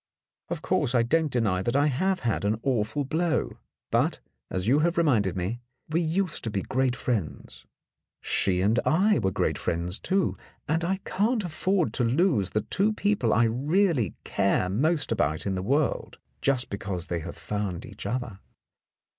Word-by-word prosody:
Of - - -4
course, 125 - +1
I 120 - +4
don't 155 +4 +1
deny 105 -7 +1
that 120 +6 -1
I 145 +1 +4
have 185 +7 +1
had 115 -4 -1
an 105 +2 0
awful 130 +2 0
blow. 165 +4 -1 0.3
But, - - +1 0.3
as 95 +2 -2
you 135 +5 +4
have 170 +2 +1
reminded 110 - +2
me, 100 +7 -3 0.3
we 165 +2 +1
used 175 +2 0
to 115 - -2
be 100 -2 -2
great 130 -1 0
friends. 115 - -4 0.5
She 90 -2 +1
and 110 +5 +3
I 200 +6 +3
were 95 - +1
great - - -1
friends, 85 +4 -2
too, 190 -1 0 0.3
and 160 +3 +1
I 190 +3 -1
can't 215 +3 +1
afford 180 +1 0
to 125 - 0
lose 120 - +2
the 105 +4 0
two 195 - +1
people 205 - +1
I 115 - +4
really 140 - +1
care 95 -1 +1
most 150 - +1
about 75 +2 0
in 100 - 0
the 95 - -2
world, 140 +9 0 0.2
just 130 -2 +1
because 100 -3 -3
they 85 -2 -2
have 85 +1 -7
found 100 -4 -3
each 100 -1 -8
other. 120 -3 -3
125 Hz, 170 wpm, -27 LUFS, 100-165 Hz, 0.5 s, I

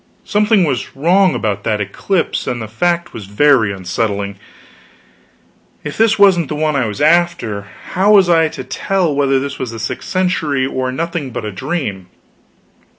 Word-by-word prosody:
Something 210 -1 +3
was 135 -6 -2
wrong 180 +6 +3
about 100 -2 -2
that 110 -2 0
eclipse, 160 - -2
and 120 - -2
the 110 - -5
fact 170 +10 -1
was 105 -4 -8
very 115 0 +3
unsettling. 100 +1 -3 1.5
If 150 - -5
this 225 0 +3
wasn't 190 -6 +4
the 150 - -4
one 155 0 0
I 130 -4 +1
was 105 - -6
after, 150 -11 +1 0.2
how 195 +4 +3
was 195 -3 +6
I 165 -2 +4
to 160 - -7
tell 190 -6 -1
whether 135 -1 +2
this 140 +1 -5
was 130 - -3
the 115 - -7
sixth 110 - -5
century, 165 -7 0
or 130 -1 -2
nothing 165 0 -3
but 120 -3 -5
a 105 - -4
dream? 105 - -4
145 Hz, 165 wpm, -16 LUFS, 110-175 Hz, 1.5 s, was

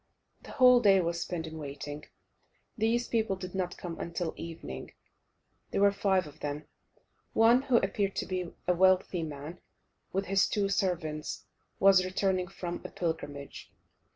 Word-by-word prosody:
The - - -11
whole 250 -1 +7
day 200 -4 +5
was 170 -1 -1
spent 170 -2 -3
in 160 0 -7
waiting; 145 +1 -6 0.7
these 230 +1 +1
people 220 -4 0
did 185 -1 -7
not 185 -2 -2
come 170 -2 -6
until 170 0 -3
evening. 165 0 -7 0.8
There - - 0
were 200 0 +6
five 195 -2 +1
of 150 +1 -13
them: 145 +1 -4 0.7
one, 230 +3 +5
who 260 -3 +3
appeared 195 -1 0
to - - -1
be 180 -2 -3 0.2
a 180 - +4
wealthy 185 0 +3
man, 155 +2 -6 0.5
with 195 +1 -1
his 195 0 +3
two 200 -2 0
servants, 165 -6 -2 0.3
was 195 -1 +6
returning 185 0 0
from 175 -2 -5
a - - -6
pilgrimage. 145 -5 -5
185 Hz, 155 wpm, -30 LUFS, 165-195 Hz, 0.8 s, whole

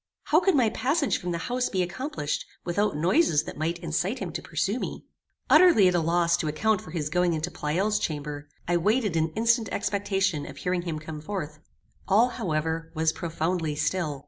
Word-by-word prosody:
How 310 - +4
could 380 -1 +2
my 235 -6 +3
passage 280 +5 0
from 180 - -5
the 170 - -1
house 250 0 0
be 185 -2 0
accomplished 175 - -3 0.2
without 180 -1 0
noises 170 - +3
that - - -8
might 165 +3 -2
incite 175 - -2
him 190 -7 -5
to - - -4
pursue 190 - -1
me? - - -5 0.4
Utterly 340 - +7
at 180 - +3
a 175 - +3
loss 170 +1 +2
to 165 - -2
account 205 +7 +1
for - - -12
his 155 -3 -3
going 180 0 +2
into 160 +2 -2
Pleyel's 185 +9 0
chamber, 145 -1 -4 0.2
I 175 0 +2
waited 210 +1 +1
in 160 0 +2
instant 230 -1 +2
expectation 195 -5 -1
of - - -10
hearing 180 0 -1
him 170 -3 -4
come 155 0 -7
forth. 155 -4 -5 0.5
All, 220 +5 +4
however, 160 -4 -2
was 160 0 +2
profoundly 165 -1 -2
still. 155 -2 -1
175 Hz, 190 wpm, -26 LUFS, 160-210 Hz, 0.5 s, Utterly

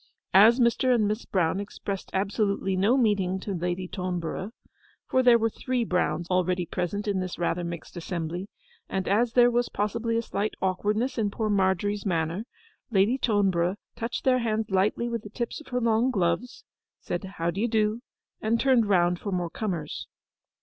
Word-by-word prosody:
As 220 +6 +7
Mr. 245 +1 +3
and 215 -3 +2
Miss 215 +3 -2
Brown 180 -1 +1
expressed 200 -1 -5
absolutely 200 -1 0
no 205 +8 +3
meaning 200 -6 +1
to 200 - -4
Lady 180 +1 -2
Toneborough 180 0 -3 0.6
(for 260 - +3
there 245 -2 +6
were 225 0 0
three 250 +1 -1
Browns 175 -4 0
already 180 0 +1
present 185 +5 -3
in 200 -2 0
this 185 -1 -4
rather 175 0 -1
mixed 170 +1 -7
assembly), 175 +1 -4 0.4
and 190 -1 -2
as 225 +4 +2
there 245 -1 +6
was 240 0 +1
possibly 230 +2 -1
a 230 - 0
slight 205 -1 -2
awkwardness 210 +7 0
in 210 -2 +1
poor 215 +1 -2
Margery's 200 +1 +1
manner, 170 +2 -1 0.4
Lady 220 +4 +3
Toneborough 190 -6 +2 0.2
touched 230 +2 -4
their 255 -1 +4
hands 220 -3 -1
lightly 195 +5 +1
with 235 -2 -2
the 210 - -10
tips 235 +7 -4
of - - -16
her 250 -1 -1
long 230 +1 +2
gloves, 195 +2 -1 0.4
said, 175 - -4
'How 175 -3 -2
d'ye 200 +7 -1
do,' 220 0 +1 0.4
and 225 +2 +1
turned 255 -5 +3
round 175 -3 +3
for 200 - -4
more 175 -2 -2
comers. 175 -8 -4
205 Hz, 170 wpm, -27 LUFS, 180-230 Hz, 0.6 s, As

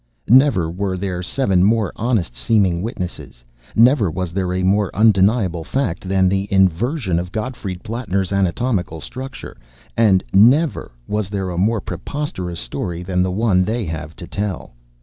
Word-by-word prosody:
Never 125 - +5
were 95 +1 -2
there 90 -1 -3
seven 95 -2 +1
more 110 -1 +2
honest 110 - -1
seeming 90 - +1
witnesses; 90 - -6 0.3
never 115 - +5
was 85 +1 -4
there 95 -1 -1
a 90 0 -1
more 100 +1 +2
undeniable 100 -4 +3
fact 95 -4 -2
than 95 -1 +3
the 95 +1 0
inversion 95 - +1
of 90 0 -5
Gottfried 110 -5 -5
Plattner's 100 -5 -2
anatomical 95 -2 -1
structure, 130 - -8 0.4
and 105 -5 +4
never 130 +10 +4 0.2
was 105 -2 -2
there 95 -2 -3
a 85 - -5
more 110 +2 +1
preposterous 90 - -5
story 85 +8 -4
than 90 0 0
the 95 - +1
one 95 -1 +2
they 110 +3 -2
have 80 -1 -6
to - - -8
tell! 100 -8 -4
95 Hz, 150 wpm, -19 LUFS, 90-110 Hz, 0.4 s, Never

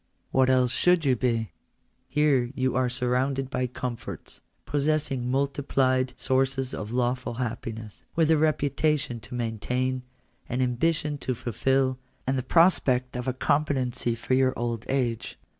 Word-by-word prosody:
What 130 0 +3
else 130 -2 +3
should 180 +3 +3
you 130 -2 +4
be? 115 -5 0 0.6
Here 145 -4 +3
are - - -7
you 130 -1 +1
surrounded 130 +2 0
by 125 -1 0
comforts, 125 -1 -6 0.2
possessing 145 -4 0
multiplied 130 -2 +1
sources 130 0 0
of 105 0 -5
lawful 125 0 -1
happiness, 115 -3 -5
with 160 -1 +3
a 160 - +5
reputation 150 -4 +1
to 120 - -9
maintain, 125 +3 -1 0.5
an 125 - -1
ambition 145 +4 0
to 130 - -2
fulfil, 130 +3 0 0.3
and 135 - +1
the 130 - 0
prospect 130 -6 +3
of 125 +1 -4
a 130 - +1
compe 145 +3 +2
tency 125 -4 -1
for 125 - -2
your 130 0 +3
old 120 -1 -3
age. 125 -4 -1
130 Hz, 140 wpm, -26 LUFS, 125-135 Hz, 0.6 s, a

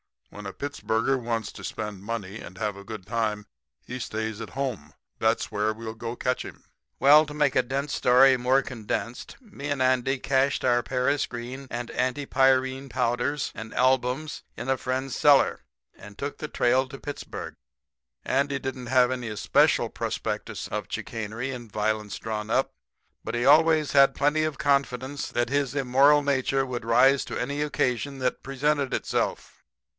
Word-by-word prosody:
When 105 0 -10
a 95 - -6
Pittsburger 135 -2 -1
wants 115 -2 -2
to - - -11
spend 105 -3 -5
money 105 -1 -5
and 90 +2 -10
have 105 0 -2
a 100 0 -11
good 110 -3 -8
time 105 -1 -1 0.4
he 125 +1 -6
stays 110 -1 -4
at - - -7
home. 125 - -4 0.3
That's - - +1
where 105 +1 0
we'll 110 0 -7
go 115 +1 -5
to - - -10
catch 125 0 0
him.' - - -11 0.4
"Well, 150 +3 +7
to 145 - -8
make 150 -3 +2
a 130 - +5
dense 140 +3 -3
story 130 +2 +5
more 130 +2 +2
condensed, 120 0 -5
me 200 - -8
and 145 -1 -1
Andy 130 +1 +2
cached 135 +1 +1
our 120 -1 +3
paris 135 +3 0
green 125 +3 -7
and 120 0 -5
antipyrine 130 0 +1
powders 125 +5 -1
and 110 0 -8
albums 130 +3 +1 0.2
in 135 - -5
a 135 - +2
friend's 130 +1 -3
cellar, 145 -2 +4 0.3
and 105 0 -13
took 140 +1 -4
the 155 - -5
trail 130 -1 +2
to 135 - -9
Pittsburg. 145 +1 -7 0.7
Andy 140 +1 +1
didn't 130 -2 -5
have 125 0 +4
any 125 -2 -3
especial 105 -3 +2
prospectus - - -4
of - - -3
chicanery 115 +4 -4
and 120 -4 -8
violence 105 0 -1
drawn 110 -1 -4
up, 130 +4 +1 0.5
but 115 - -4
he 120 +1 0
always 155 +1 +5
had 135 -1 +5
plenty 150 +2 +2
of 155 -3 -3
confidence 140 -2 0
that 120 0 -1
his 140 -1 0
immoral 140 +2 +4
nature 135 -1 +1
would 125 -3 -5
rise 130 +4 +5
to - - -5
any 140 +4 -2
occasion 140 -2 -1
that 130 -1 -1
presented 140 0 0
itself. - - -2
130 Hz, 170 wpm, -26 LUFS, 115-140 Hz, 0.7 s, Well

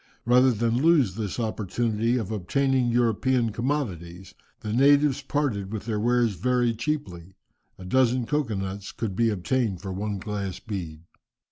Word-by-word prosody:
Rather 125 +2 +5
than 115 +2 0
lose 150 - +4
this 105 +1 -4
opportunity 115 +1 -1
of 110 -4 -3
obtaining 130 +6 +1
European 120 0 +1
commodities, 95 - -3 0.3
the 105 -1 -4
natives 140 +2 +4
parted 135 -9 -2
with 110 -2 -5
their 110 -3 -2
wares 120 0 +2
very 120 +5 +1
cheaply; 110 - -4 0.4
a 95 - -10
dozen 125 +3 +2
cocoa 145 -5 -1
nuts 95 +1 -5
could 105 -5 -4
be 115 +2 +2
obtained 105 0 -1
for 95 0 -6
one 100 +2 -3
glass 100 -2 -4
bead. 85 -7 -6
115 Hz, 145 wpm, -25 LUFS, 100-125 Hz, 0.4 s, Rather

